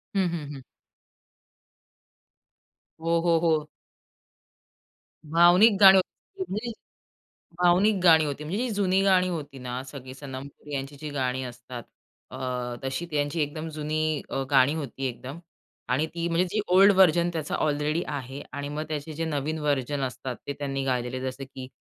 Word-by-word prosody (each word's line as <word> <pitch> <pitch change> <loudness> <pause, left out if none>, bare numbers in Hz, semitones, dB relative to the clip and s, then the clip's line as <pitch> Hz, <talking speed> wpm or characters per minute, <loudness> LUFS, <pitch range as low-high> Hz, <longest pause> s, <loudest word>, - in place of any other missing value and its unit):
हं, 190 -3 +2
हं, 150 -4 -5
हं. 135 - -9 2.4
हो, 165 0 +2
हो, 170 -1 +3
हो. 160 -3 +1 1.6
भावनिक 175 +7 +5
गाणी 195 -1 +10
होती 380 - -3
म्हणजे, 225 +4 -3 0.9
भावनिक 190 +5 +5
गाणी 160 -3 +6
होती 145 +1 -4
म्हणजे 200 +10 -2
जी - - -4
जुनी 195 -1 +2
गाणी 185 -2 +4
होती 145 -6 -5
ना 125 0 -4
सगळी 130 -2 -9
सनमपूर 135 +1 -9
यांची 135 +1 -4
जी 155 - -5
गाणी 130 -2 -1
असतात, 120 -1 -8 0.5
अ, - - -7 0.5
तशी 135 +6 -3
त्यांची 145 +2 0
एकदम 155 +2 -3
जुनी 155 0 -1
अ, 135 0 -2
गाणी 135 +1 +5
होती 135 -3 -4
एकदम 130 +6 -7 0.5
आणि 150 +5 +2
ती 170 0 -1
म्हणजे 170 +2 +2
जी 215 - 0 0.2
ओल्ड 195 +2 +8
व्हर्जन 175 -2 +5
त्याचा 155 -3 -2
ऑलरेडी 150 +2 0
आहे 135 0 -5
आणि 145 +1 -4
मग 150 +1 -3
त्याचे 155 0 -4
जे 165 +2 -3
नवीन 155 0 -2
व्हर्जन 145 -1 -1
असतात 130 0 -4
ते 140 - -2
त्यांनी 135 -1 -2
गायलेले, 125 -1 -1
जसं 130 +1 -4
की 130 -1 -9
150 Hz, 150 wpm, -26 LUFS, 135-170 Hz, 2.4 s, गाणी